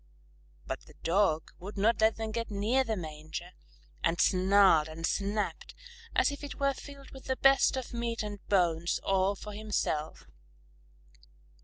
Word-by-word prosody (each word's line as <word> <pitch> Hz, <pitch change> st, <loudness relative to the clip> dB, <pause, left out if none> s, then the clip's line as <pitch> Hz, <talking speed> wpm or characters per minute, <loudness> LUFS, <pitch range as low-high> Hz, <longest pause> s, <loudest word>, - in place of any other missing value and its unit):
But -, -, -6 dB
the -, -, -16 dB
Dog 165 Hz, -3 st, +2 dB
would 200 Hz, +4 st, -8 dB
not 220 Hz, +2 st, +2 dB
let 220 Hz, 0 st, +4 dB
them 220 Hz, -1 st, -4 dB
get 230 Hz, +1 st, -3 dB
near 215 Hz, +6 st, +1 dB
the 225 Hz, -4 st, -2 dB
manger, 155 Hz, +1 st, -7 dB, 0.5 s
and 165 Hz, +1 st, +1 dB
snarled 190 Hz, -4 st, +5 dB
and 160 Hz, +1 st, -4 dB
snapped 205 Hz, +3 st, -2 dB, 0.4 s
as -, -, +4 dB
if 285 Hz, 0 st, -8 dB
it 285 Hz, -, -7 dB
were 275 Hz, 0 st, +2 dB
filled 280 Hz, 0 st, -11 dB
with 265 Hz, -, -12 dB
the 260 Hz, -, 0 dB
best 270 Hz, 0 st, +4 dB
of 255 Hz, -2 st, -5 dB
meat 235 Hz, -1 st, -2 dB
and 205 Hz, -1 st, -6 dB
bones, 175 Hz, -3 st, +2 dB
all 195 Hz, +1 st, +2 dB
for 210 Hz, +1 st, -9 dB
himself. 205 Hz, -7 st, -2 dB
205 Hz, 155 wpm, -30 LUFS, 180-230 Hz, 0.5 s, snarled